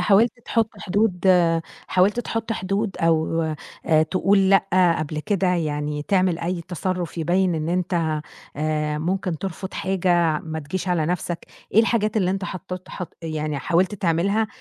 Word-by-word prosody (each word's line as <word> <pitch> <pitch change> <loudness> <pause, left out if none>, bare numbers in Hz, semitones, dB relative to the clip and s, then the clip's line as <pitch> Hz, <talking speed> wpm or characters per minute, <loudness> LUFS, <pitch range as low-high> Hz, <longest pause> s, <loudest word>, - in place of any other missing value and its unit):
حاولت 210 +3 +4
تحط 225 -2 +1
حدود 200 -2 0 0.6
حاولت 195 +6 +3
تحط 225 -1 -3
حدود 195 +1 -2
أو، 165 0 +2 0.4
آآ 155 -1 +5
تقول 190 +3 +2
لأ 185 -3 +4
قبل 155 0 -3
كده، 195 +1 0
يعني 150 -4 -1
تعمل 185 0 +2
أي 175 +1 -2
تصرُّف 175 0 -3
يبيّن 175 +2 +2
إن 155 0 -2
أنت 170 -3 0 0.4
آآ 150 0 -1
ممكن 180 +1 -1
ترفض 190 +1 -5
حاجة، 175 -4 +1
ما 160 0 -5
تجيش 170 +5 -4
على 165 -4 +1
نفْسك، 175 -1 -3 0.3
إيه 220 - +8
الحاجات 225 -2 +1
اللي 185 -4 +2
أنت 195 +1 -2
حطت 185 -1 -6
حط 180 -3 -7
يعني 155 -2 -2
حاولت 180 +7 +1
تعملها، 195 +4 +1
180 Hz, 150 wpm, -23 LUFS, 160-195 Hz, 0.6 s, إيه